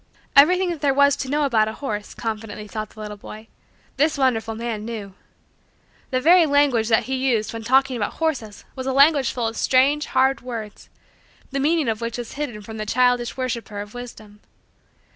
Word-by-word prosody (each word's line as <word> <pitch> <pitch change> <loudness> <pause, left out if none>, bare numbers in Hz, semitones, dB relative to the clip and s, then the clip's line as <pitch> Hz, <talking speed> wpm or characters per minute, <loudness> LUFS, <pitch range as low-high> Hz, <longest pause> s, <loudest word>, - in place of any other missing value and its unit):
Everything 360 +6 +5
that 325 -4 -6
there 280 -2 +2
was 280 0 +5
to 270 -2 -5
know 295 +1 +1
about 220 -5 +2
a 220 - -4
horse, 210 -6 -5
confidently 215 -2 -5
thought 215 0 -5
the 215 - -16
little 210 -1 -6
boy, 215 +2 -11 0.5
this 300 +2 +2
wonderful 225 -5 0
man 225 -2 -4
knew. 215 -4 -6 1.0
The 255 - 0
very 335 +4 +5
language 280 -6 +3
that 225 -1 +3
he 265 - -4
used 255 -5 0
when 225 0 -6
talking 265 +2 +3
about 205 - -2
horses 260 -11 -3
was 260 -1 -5
a 265 - 0
language 280 -1 +4
full 240 -2 -2
of 225 - -4
strange, 275 +6 +2
hard, 265 +1 +2
words, 230 -4 -8 0.6
the 275 - -2
meaning 305 0 +1
of 220 0 -1
which 230 +1 -3
was 240 -1 -6
hidden 245 -8 -5
from 220 +1 -9
the 215 - -4
childish 245 +1 +1
worshiper 235 -5 -4
of 205 0 -8
wisdom. 220 -4 -10
245 Hz, 190 wpm, -22 LUFS, 220-275 Hz, 1.0 s, Everything